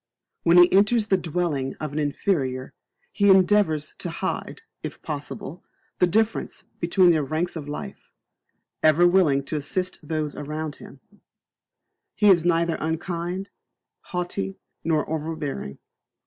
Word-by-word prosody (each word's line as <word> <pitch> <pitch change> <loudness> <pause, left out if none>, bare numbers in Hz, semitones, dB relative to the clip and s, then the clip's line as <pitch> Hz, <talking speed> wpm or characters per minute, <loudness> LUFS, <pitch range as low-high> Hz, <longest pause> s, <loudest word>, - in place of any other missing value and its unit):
When 170 +1 +4
he 175 0 +7
enters 210 +3 +4
the 200 - +3
dwelling 160 -6 -2
of 155 -2 -5
an 155 - -1
inferior, 140 -4 -1 0.4
he 200 0 +3
endeavours 185 -5 +4
to 175 - -4
hide, 170 - -4 0.2
if - - -6
possible, - - -6 0.4
the 180 - +5
difference 220 +5 0 0.2
between 175 +1 +4
their 155 -3 +2
ranks 155 +5 -2
of 150 -3 -6
life; 145 - -7 0.7
ever 155 +3 +5
willing 170 -7 +3
to 155 - -3
assist 180 +5 -3
those 155 -1 -3
around 150 +1 -5
him, 135 - -13 1.1
he 210 - +4
is 170 -3 +4
neither 170 -1 +2
unkind, 175 +4 -3 0.5
haughty, 185 +2 -3 0.3
nor 155 -3 +1
over 160 +1 -3
bearing. 140 - -5
165 Hz, 135 wpm, -24 LUFS, 150-185 Hz, 1.1 s, he